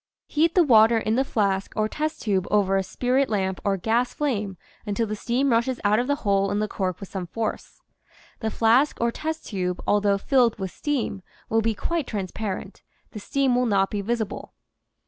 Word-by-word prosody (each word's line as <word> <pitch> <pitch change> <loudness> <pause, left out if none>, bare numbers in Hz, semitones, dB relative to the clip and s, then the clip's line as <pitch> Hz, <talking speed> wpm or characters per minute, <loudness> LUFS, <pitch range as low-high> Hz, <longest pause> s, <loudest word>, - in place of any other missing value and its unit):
Heat 320 +2 +1
the 360 - +6
water 225 -4 +6
in 220 0 0
the 260 +3 +3
flask 200 -6 -1
or 215 -1 +1
test 310 +6 -3
tube 195 -4 0
over 195 -2 +2
a 195 - +3
spirit 250 +8 0
lamp 190 -3 -1
or 200 -1 +1
gas 230 +6 0
flame 210 -10 -2 0.3
until 210 +1 -1
the 215 0 -3
steam 250 +5 0
rushes 235 +2 +1
out 210 +2 +3
of 245 - -1
the 285 - +2
hole 195 -1 +2
in 205 - -1
the 215 0 0
cork 185 -3 -3
with 195 - -8
some 185 -2 -5
force. 220 +4 -5 0.6
The 220 - -1
flask 235 +7 +3
or 235 0 +1
test 315 +5 -4
tube, 180 -3 -2
al 205 - +3
though 200 -1 +2
filled 240 +1 +2
with 190 -2 -4
steam, 255 - -2 0.3
will 225 0 +2
be 225 0 0
quite 335 +1 -2
transparent; 200 -1 -5 0.3
the 210 - -7
steam 275 +4 +1
will 250 0 +2
not 195 -3 +2
be 205 - -2
visible. 220 -1 -3
220 Hz, 200 wpm, -24 LUFS, 200-250 Hz, 0.6 s, the